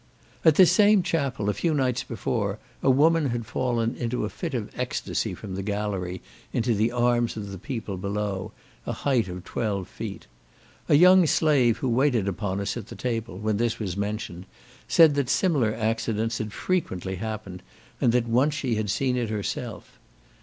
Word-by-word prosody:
At 160 Hz, -, +6 dB
this 185 Hz, 0 st, +7 dB
same 210 Hz, -2 st, +5 dB
chapel, 135 Hz, -11 st, -1 dB
a 105 Hz, -, +2 dB
few 165 Hz, -, 0 dB
nights 125 Hz, -3 st, 0 dB
before, 110 Hz, -3 st, -2 dB, 0.2 s
a -, -, +2 dB
woman 155 Hz, +3 st, +4 dB
had 120 Hz, -2 st, -3 dB
fallen 120 Hz, 0 st, -1 dB
in 120 Hz, -2 st, -3 dB
a 125 Hz, -, -1 dB
fit -, -, -5 dB
of -, -, -3 dB
ecstasy -, -, -2 dB
from 95 Hz, -, -8 dB
the 95 Hz, -, -3 dB
gallery, 100 Hz, -3 st, -3 dB, 0.3 s
into 120 Hz, 0 st, +1 dB
the 110 Hz, +2 st, +1 dB
arms 120 Hz, -1 st, +1 dB
of 100 Hz, -2 st, -5 dB
the 95 Hz, -, -7 dB
people 110 Hz, -, -5 dB
below, 100 Hz, +1 st, -3 dB, 0.4 s
a -, -, -1 dB
height 125 Hz, -8 st, +1 dB
of 90 Hz, -1 st, -7 dB
twelve 100 Hz, -5 st, -2 dB
feet. -, -, -7 dB, 0.6 s
A -, -, +6 dB
young 180 Hz, +2 st, +7 dB
slave 140 Hz, -8 st, +3 dB
who 130 Hz, -, -2 dB
waited 120 Hz, -4 st, +2 dB
upon 95 Hz, +1 st, -2 dB
us 100 Hz, 0 st, -2 dB
at 120 Hz, -4 st, -6 dB
table, 115 Hz, -5 st, -3 dB
when 105 Hz, +1 st, -1 dB
this 115 Hz, 0 st, 0 dB
was 95 Hz, -5 st, -3 dB
mentioned, 100 Hz, -3 st, -4 dB, 0.4 s
said, 160 Hz, -3 st, +6 dB
that 140 Hz, -3 st, -1 dB
similar 145 Hz, -, +2 dB
accidents 115 Hz, 0 st, -1 dB
had 110 Hz, -1 st, -4 dB
frequently 95 Hz, -, -2 dB
happened, 105 Hz, -3 st, -6 dB, 0.4 s
and 120 Hz, -, +4 dB
that 120 Hz, 0 st, +2 dB
once 130 Hz, +6 st, +2 dB
she 130 Hz, -5 st, -1 dB
had 105 Hz, -1 st, -2 dB
seen 125 Hz, +6 st, +1 dB
it 120 Hz, -3 st, -1 dB
herself. 105 Hz, -2 st, -5 dB
115 Hz, 175 wpm, -26 LUFS, 100-130 Hz, 0.6 s, this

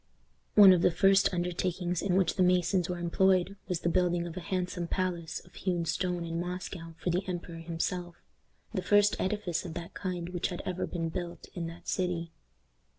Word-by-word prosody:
One 200 Hz, -3 st, +10 dB
of 175 Hz, -, +3 dB
the -, -, +5 dB
first 195 Hz, +3 st, +4 dB
undertakings 175 Hz, 0 st, -1 dB
in 185 Hz, -2 st, +1 dB
which 190 Hz, -3 st, +3 dB
the 190 Hz, -, -1 dB
masons 180 Hz, 0 st, +3 dB
were 180 Hz, -, -2 dB
employed 185 Hz, +2 st, +2 dB
was 180 Hz, -3 st, -2 dB
the -, -, -1 dB
building 175 Hz, -1 st, +2 dB
of 170 Hz, -1 st, -6 dB
a -, -, -3 dB
handsome 180 Hz, -1 st, -2 dB
palace 175 Hz, -3 st, -2 dB
of 175 Hz, -, -20 dB
hewn 175 Hz, -3 st, -1 dB
stone 180 Hz, 0 st, -1 dB
in 165 Hz, 0 st, -3 dB
Moscow 175 Hz, -1 st, -5 dB
for 175 Hz, -, -1 dB
the 180 Hz, +2 st, +1 dB
emperor 175 Hz, -2 st, -5 dB
himself, 170 Hz, +1 st, -3 dB, 0.6 s
the 190 Hz, -, -1 dB
first 205 Hz, +2 st, +4 dB
edifice 190 Hz, -4 st, -1 dB
of 170 Hz, -2 st, -7 dB
that 170 Hz, -1 st, -6 dB
kind 180 Hz, -3 st, -4 dB
which 180 Hz, 0 st, -1 dB
had 175 Hz, -, -6 dB
ever 185 Hz, 0 st, -2 dB
been 165 Hz, -2 st, -2 dB
built 175 Hz, +1 st, -5 dB
in 170 Hz, -2 st, -3 dB
that 165 Hz, +1 st, -10 dB
city. 175 Hz, -3 st, -1 dB
180 Hz, 190 wpm, -30 LUFS, 170-185 Hz, 0.6 s, One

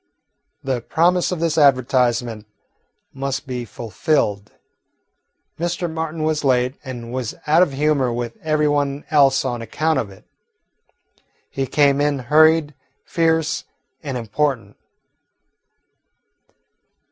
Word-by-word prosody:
The 130 Hz, -3 st, -2 dB
promise 175 Hz, +8 st, +1 dB
of 180 Hz, -, -3 dB
this 165 Hz, -1 st, +1 dB
advertisement 125 Hz, -5 st, +2 dB, 0.7 s
must 135 Hz, +1 st, -3 dB
be 125 Hz, -2 st, -5 dB
fulfilled. 110 Hz, -2 st, -1 dB, 1.1 s
Mr. 175 Hz, +1 st, -2 dB
Martin 160 Hz, -1 st, -4 dB
was 155 Hz, -1 st, 0 dB
late, 125 Hz, -1 st, +2 dB
and 120 Hz, -3 st, -7 dB
was 125 Hz, -4 st, -3 dB
out 155 Hz, +3 st, +4 dB
of 180 Hz, -6 st, +2 dB
humour 140 Hz, -3 st, +1 dB
with 120 Hz, 0 st, -4 dB
every 155 Hz, -1 st, +1 dB
one 145 Hz, -1 st, -1 dB
else 140 Hz, -3 st, +4 dB
on 120 Hz, -2 st, -2 dB
account 155 Hz, +7 st, 0 dB
of 105 Hz, -, -3 dB
it. 95 Hz, -, -16 dB, 1.3 s
He 135 Hz, -1 st, -2 dB
came 140 Hz, 0 st, +3 dB
in 145 Hz, -1 st, +1 dB
hurried, 155 Hz, +4 st, +3 dB, 0.3 s
fierce, 160 Hz, -1 st, 0 dB, 0.4 s
and 135 Hz, -4 st, -4 dB
important. 125 Hz, +3 st, -2 dB
140 Hz, 110 wpm, -20 LUFS, 125-155 Hz, 1.3 s, out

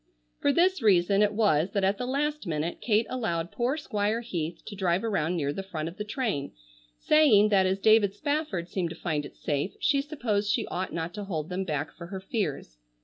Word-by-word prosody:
For 285 Hz, -, +3 dB
this 360 Hz, +2 st, +3 dB
reason 195 Hz, -1 st, +4 dB
it 210 Hz, -1 st, +4 dB
was 200 Hz, -5 st, +2 dB
that 200 Hz, -, 0 dB
at 195 Hz, +1 st, +1 dB
the 250 Hz, -, -2 dB
last 295 Hz, -1 st, -1 dB
minute 160 Hz, +1 st, -2 dB
Kate 220 Hz, 0 st, +2 dB
allowed 170 Hz, -9 st, -2 dB
poor 250 Hz, +5 st, 0 dB
Squire 215 Hz, -5 st, -1 dB
Heath 170 Hz, -8 st, -4 dB
to 210 Hz, -, -7 dB
drive 185 Hz, -1 st, +1 dB
around 180 Hz, -6 st, 0 dB
near 145 Hz, -3 st, -1 dB
the 195 Hz, -, -4 dB
front 165 Hz, -5 st, -5 dB
of 170 Hz, -, -8 dB
the 210 Hz, -, -3 dB
train, 210 Hz, -, -2 dB, 0.4 s
saying 235 Hz, -10 st, +5 dB
that 190 Hz, -2 st, +4 dB
as 190 Hz, +1 st, +1 dB
David 205 Hz, -1 st, +4 dB
Spafford 285 Hz, -, -2 dB
seemed 180 Hz, -1 st, -2 dB
to 165 Hz, -, -7 dB
find 150 Hz, -4 st, -2 dB
it -, -, -19 dB
safe 145 Hz, +5 st, -2 dB
she 280 Hz, -1 st, +2 dB
supposed 230 Hz, -9 st, -2 dB
she -, -, +1 dB
ought 185 Hz, +1 st, -3 dB
not 165 Hz, +1 st, -4 dB
to 205 Hz, -1 st, -5 dB
hold 160 Hz, -5 st, -3 dB
them 185 Hz, +1 st, -2 dB
back 150 Hz, -3 st, -2 dB
for 170 Hz, -, -10 dB
her 190 Hz, +2 st, -6 dB
fears. 155 Hz, -, -3 dB
195 Hz, 210 wpm, -28 LUFS, 170-225 Hz, 0.4 s, saying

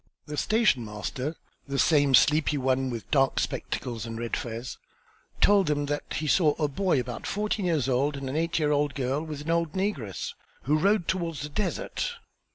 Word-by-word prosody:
The 150 Hz, -, -6 dB
station 215 Hz, -, +2 dB
master, 120 Hz, +8 st, -4 dB, 0.3 s
the 140 Hz, 0 st, -2 dB
same 145 Hz, -3 st, +5 dB
sleepy 150 Hz, +1 st, +4 dB
one 130 Hz, 0 st, +1 dB
with 115 Hz, -3 st, -6 dB
dark 135 Hz, -2 st, +3 dB
spectacles 120 Hz, -4 st, -3 dB
and 115 Hz, 0 st, -5 dB
red 115 Hz, 0 st, -2 dB
fez, 115 Hz, +1 st, -5 dB, 0.6 s
told 200 Hz, -3 st, +5 dB
them 145 Hz, -1 st, +1 dB
that 145 Hz, +1 st, -3 dB
he 155 Hz, -, -2 dB
saw 155 Hz, 0 st, +3 dB
a 150 Hz, -, 0 dB
boy 165 Hz, +1 st, +1 dB
about 120 Hz, -1 st, -5 dB
fourteen 210 Hz, -1 st, -1 dB
years 155 Hz, -7 st, +1 dB
old 140 Hz, +3 st, +1 dB
and 135 Hz, -1 st, -5 dB
an 130 Hz, -, -3 dB
eight 165 Hz, +1 st, 0 dB
year 150 Hz, -2 st, +2 dB
old 145 Hz, -1 st, +1 dB
girl 135 Hz, +2 st, -1 dB
with 155 Hz, -2 st, -6 dB
an 160 Hz, +3 st, -2 dB
old 165 Hz, -2 st, +1 dB
negress, 170 Hz, -, -2 dB, 0.3 s
who 150 Hz, +3 st, +2 dB
rode 200 Hz, 0 st, +2 dB
towards 170 Hz, -5 st, -1 dB
the 150 Hz, -, -4 dB
desert. 210 Hz, -, -2 dB
145 Hz, 185 wpm, -27 LUFS, 130-165 Hz, 0.6 s, same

